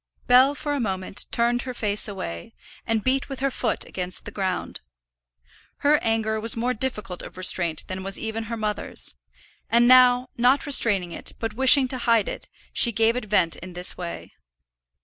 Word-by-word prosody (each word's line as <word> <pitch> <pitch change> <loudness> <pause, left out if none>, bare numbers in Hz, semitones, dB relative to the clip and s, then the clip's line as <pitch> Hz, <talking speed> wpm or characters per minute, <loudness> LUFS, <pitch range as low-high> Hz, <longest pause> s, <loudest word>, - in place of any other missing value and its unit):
Bell 260 +3 +4
for 290 0 -4
a 285 - -2
moment 190 -4 -4
turned 240 +1 0
her 255 0 -7
face 210 -2 +3
away, 85 - -8 0.3
and 225 -2 -1
beat 265 +2 0
with 270 - -7
her 275 0 -1
foot 235 -3 -3
against 180 0 -6
the 210 - -7
ground. 190 -3 -4 1.0
Her 295 +1 +4
anger 220 -1 -1
was 230 +1 0
more 245 +2 -1
difficult 210 -7 -5
of - - -12
restraint 175 -3 +2
than 185 0 -6
was 195 +1 -4
even 225 0 -5
her 230 +1 -5
mother's, 210 -1 -3 0.6
and 235 +1 +3
now, 250 0 +5
not 250 +5 +2
restraining 205 - +3
it, - - -6
but 225 -2 -5
wishing 265 +2 +6
to 255 - -3
hide 230 -4 +1
it, - - -7 0.2
she 235 - +6
gave 225 +2 +1
it 250 - -4
vent 185 -5 +1
in 180 +1 -10
this 180 +1 +1
way. 175 -2 -8
225 Hz, 180 wpm, -23 LUFS, 195-250 Hz, 1.0 s, wishing